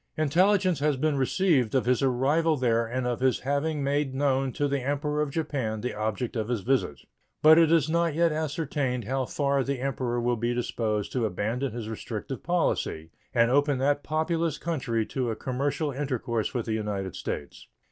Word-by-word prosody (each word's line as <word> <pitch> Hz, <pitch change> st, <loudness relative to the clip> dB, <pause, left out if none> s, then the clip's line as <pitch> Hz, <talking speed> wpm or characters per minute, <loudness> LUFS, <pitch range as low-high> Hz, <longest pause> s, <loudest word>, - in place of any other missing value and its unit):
Intelligence 180 Hz, +3 st, +3 dB
has 145 Hz, -1 st, +1 dB
been 155 Hz, +2 st, +1 dB
received 135 Hz, -, +2 dB
of 130 Hz, -, +2 dB
his 125 Hz, -1 st, +2 dB
arrival 145 Hz, +5 st, +2 dB
there 115 Hz, -3 st, +1 dB
and 125 Hz, +2 st, -2 dB
of 120 Hz, -1 st, -1 dB
his 130 Hz, 0 st, +1 dB
having 145 Hz, +2 st, -1 dB
made 140 Hz, -1 st, 0 dB
known 135 Hz, -1 st, +1 dB
to 145 Hz, -2 st, 0 dB
the 140 Hz, 0 st, 0 dB
Emperor 145 Hz, +3 st, -1 dB
of 150 Hz, -, 0 dB
Japan 135 Hz, -8 st, -2 dB
the 125 Hz, -, -3 dB
object 110 Hz, +3 st, -3 dB
of 110 Hz, -2 st, -1 dB
his 120 Hz, -4 st, -1 dB
visit. 125 Hz, -, 0 dB, 0.4 s
But 160 Hz, +2 st, +8 dB
it 165 Hz, -1 st, +4 dB
is 165 Hz, -3 st, +4 dB
not 170 Hz, -1 st, +1 dB
yet 170 Hz, 0 st, +3 dB
ascertained 145 Hz, -5 st, -2 dB
how 130 Hz, +4 st, -1 dB
far 140 Hz, 0 st, 0 dB
the 140 Hz, 0 st, -2 dB
Emperor 125 Hz, -2 st, -1 dB
will 120 Hz, 0 st, 0 dB
be 120 Hz, +2 st, -1 dB
disposed 110 Hz, -4 st, -2 dB
to 120 Hz, -4 st, 0 dB
abandon 110 Hz, +7 st, -2 dB
his 115 Hz, -1 st, -5 dB
restrictive 110 Hz, +3 st, -5 dB
policy 160 Hz, -, -1 dB, 0.2 s
and 115 Hz, 0 st, +3 dB
open 145 Hz, 0 st, +3 dB
that 145 Hz, +2 st, +1 dB
populous 160 Hz, +1 st, -1 dB
country 130 Hz, -9 st, -1 dB
to 125 Hz, 0 st, -2 dB
a 110 Hz, -, -2 dB
commercial 140 Hz, +5 st, -2 dB
intercourse 125 Hz, -5 st, -2 dB
with 120 Hz, -4 st, -2 dB
the 110 Hz, -, -2 dB
United 105 Hz, -4 st, -3 dB
States. 70 Hz, -, -6 dB
135 Hz, 185 wpm, -27 LUFS, 120-150 Hz, 0.4 s, But